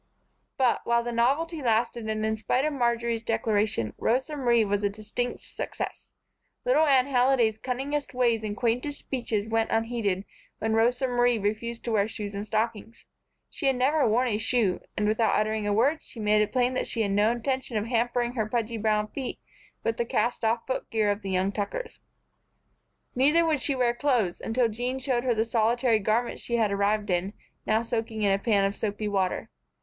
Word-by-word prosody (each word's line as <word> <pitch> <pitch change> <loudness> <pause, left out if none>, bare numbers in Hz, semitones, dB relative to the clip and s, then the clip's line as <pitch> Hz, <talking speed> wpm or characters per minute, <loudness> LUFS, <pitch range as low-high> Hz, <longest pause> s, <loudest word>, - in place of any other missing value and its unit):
But, 260 -3 +2
while 235 0 +2
the 240 - -3
novelty 290 +8 +1
lasted 230 -1 0
and 215 0 -1
in 220 0 0
spite 250 +5 0
of 305 - 0
Marjory's 235 -3 0
declaration, 215 - 0
Rosa 265 +6 0
Marie 240 -5 +3
was 205 0 -1
a 205 - +2
distinct 215 +4 -4
success. - - -6 0.6
Little 410 -11 +4
Anne 265 -3 +5
Halliday's 245 -4 +2
cunningest 270 +4 -3
ways 235 -3 +2
and 210 -1 -4
quaintest 250 +5 -1
speeches 225 -5 -3
went 225 0 0
unheeded 225 -4 -1 0.3
when 220 0 -1
Rosa 240 +4 +2
Marie 245 -1 +2
refused 220 +3 -3
to 235 - -3
wear 210 -2 +2
shoes 210 -2 -6
and 200 +1 -5
stockings. 220 +1 -3 0.4
She 280 - -3
had 270 - +3
never 275 +4 +2
worn 240 +4 +2
a 210 -2 0
shoe, 225 -5 +1 0.2
and, 210 - +1
without 220 +1 +2
uttering 215 0 -1
a - - +1
word, 280 +10 +2
she 230 - -12
made 210 0 +3
it 210 - 0
plain 250 0 +1
that 255 - -1
she 230 - -1
had 200 - -1
no 205 +3 +3
intention 255 0 -2
of 210 - -1
hampering 240 +1 0
her 220 -4 -2
pudgy 230 0 -1
brown 215 -1 +1
feet 265 +1 -5 0.5
with 225 - -1
the 235 - 0
cast 235 +1 -1
off 230 +1 +1
footgear 220 -5 0
of 205 +1 -3
the 195 - -5
young 190 +1 +1
Tuckers. 210 - -4 1.1
Neither 300 +6 +4
would 310 -4 +1
she 280 - 0
wear 245 -2 +2
clothes, 240 -8 0
until 235 +1 +1
Jean 245 +4 -3
showed 260 -2 0
her 245 -2 +2
the 220 +1 +1
solitary 230 +1 +2
garment 220 +4 0
she 235 - -3
had 220 -3 +2
arrived 205 0 +1
in, 180 +3 0 0.3
now 220 +1 +2
soaking 225 -2 -3
in 200 - +3
a 195 - +2
pan 200 -2 +2
of 195 +1 -1
soapy 210 0 -3
water. 195 -3 -1
230 Hz, 190 wpm, -27 LUFS, 215-250 Hz, 1.1 s, Anne